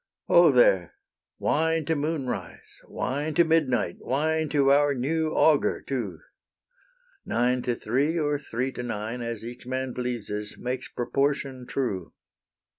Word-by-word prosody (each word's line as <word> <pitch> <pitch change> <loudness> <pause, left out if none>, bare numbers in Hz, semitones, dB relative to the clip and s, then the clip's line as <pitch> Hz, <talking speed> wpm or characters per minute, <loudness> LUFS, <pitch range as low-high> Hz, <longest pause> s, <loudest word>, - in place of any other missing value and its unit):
Ho, - - +6
there! - - +4 0.4
wine 160 +1 +1
to 160 - +1
moonrise, 145 -4 -4
wine 145 +4 -3
To 170 - +6
midnight, 140 - +1
wine 155 +3 0
to 140 -2 +3
our 145 0 +4
new 155 +5 0
augur 155 -3 +3
too! 115 -11 -3 1.1
Nine 125 +2 +1
to 120 -1 -1
three 140 +10 0
or 145 -2 0
three 130 -1 -3
to 125 - -6
nine, 115 0 -4
As 115 -2 -4
each 120 +1 -9
man 130 0 -2
pleases, 110 -4 -4
makes 125 +1 -4
proportion 135 0 -1
true. 100 -10 -3
130 Hz, 130 wpm, -26 LUFS, 120-150 Hz, 1.1 s, Ho